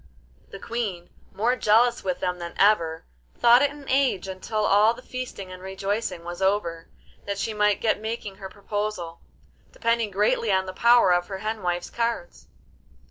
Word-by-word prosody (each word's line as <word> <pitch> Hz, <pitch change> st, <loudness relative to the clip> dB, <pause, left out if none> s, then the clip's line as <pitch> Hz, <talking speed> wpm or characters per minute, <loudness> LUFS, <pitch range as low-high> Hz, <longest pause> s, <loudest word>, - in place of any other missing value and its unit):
The -, -, -9 dB
Queen, 200 Hz, -6 st, -4 dB, 0.2 s
more 235 Hz, +5 st, +1 dB
jealous 235 Hz, +1 st, +3 dB
with 185 Hz, -2 st, -2 dB
them 180 Hz, -1 st, -2 dB
than 170 Hz, 0 st, -7 dB
ever, 170 Hz, -6 st, +2 dB, 0.3 s
thought 240 Hz, +2 st, +6 dB
it 285 Hz, -, +3 dB
an 290 Hz, -1 st, -12 dB
age 260 Hz, -8 st, +1 dB
until 210 Hz, +3 st, -2 dB
all 210 Hz, +4 st, +4 dB
the 250 Hz, -, -13 dB
feasting 250 Hz, -8 st, -7 dB
and 185 Hz, 0 st, -10 dB
rejoicing 195 Hz, -1 st, -3 dB
was 175 Hz, +1 st, -7 dB
over, 180 Hz, -4 st, 0 dB, 0.4 s
that 200 Hz, 0 st, -2 dB
she 220 Hz, +2 st, -2 dB
might 210 Hz, -1 st, +2 dB
get 220 Hz, -2 st, +1 dB
making 220 Hz, -3 st, -5 dB
her 190 Hz, -1 st, -8 dB
proposal, 205 Hz, -4 st, -4 dB, 0.5 s
depending 230 Hz, -1 st, 0 dB
greatly 210 Hz, +2 st, +1 dB
on 190 Hz, 0 st, +2 dB
the 185 Hz, -, -6 dB
power 235 Hz, -2 st, +5 dB
of 175 Hz, 0 st, +1 dB
the 195 Hz, -, -5 dB
hen 215 Hz, +2 st, -4 dB
wife's 175 Hz, -1 st, -2 dB
cards. 235 Hz, -, -3 dB
205 Hz, 170 wpm, -25 LUFS, 185-230 Hz, 0.5 s, thought